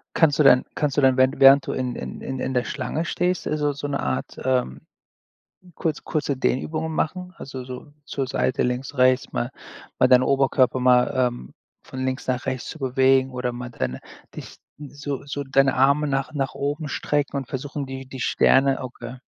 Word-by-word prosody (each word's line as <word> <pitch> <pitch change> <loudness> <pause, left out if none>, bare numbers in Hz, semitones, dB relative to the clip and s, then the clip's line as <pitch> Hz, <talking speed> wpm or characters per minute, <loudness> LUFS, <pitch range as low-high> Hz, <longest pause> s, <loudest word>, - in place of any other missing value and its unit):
Kannst 155 -3 +3
du - - +6
denn 130 -2 +6
kannst 145 -2 -1
du 145 - +2
denn 130 -1 +4
während 130 +1 +2
während 135 +1 +7
du - - -2
in 125 -1 -2
in 65 0 -7
in 130 -1 -5
in 130 - -2
der 125 -1 +1
Schlange 145 +4 -3
stehst, 180 +1 -1
äh, 155 - -1
so 145 -1 0
so 145 +1 -7
'ne 140 -1 -2
Art, 130 - -3
ähm, 125 - 0 1.0
kurz 160 -4 -2
kurze 145 -3 -2
Dehnübungen 155 +5 -1
machen? 180 +3 -3
Also, 130 -1 -7
so 130 +3 -9
zur 135 -2 -3
Seite 130 0 0
links, 125 +2 -3
rechts 130 0 +3
mal - - -2 0.5
mal 130 - +5
deinen 125 0 +6
Oberkörper 130 -2 +2
mal, 125 -1 +4
ähm, 125 - -1 0.3
von 130 0 -6
links 130 0 -3
nach 130 0 -2
rechts 130 -2 -3
zu 160 - -8
bewegen 130 0 +3
oder 125 -1 -3
mal 125 0 -6
deine 65 - -4 0.4
dich - - -9 0.2
so 145 -1 -6
so 140 0 -4
deine 135 0 +2
Arme 140 +3 +3
nach 135 +1 -2
nach 135 -2 -2
oben 145 +2 -3
strecken 145 0 -1
und 135 -3 -4
versuchen, 140 +1 -5
die 135 0 -8
die 130 - -8
Sterne 135 +2 +3
okay. 130 0 -8
135 Hz, 195 wpm, -23 LUFS, 130-145 Hz, 1.0 s, während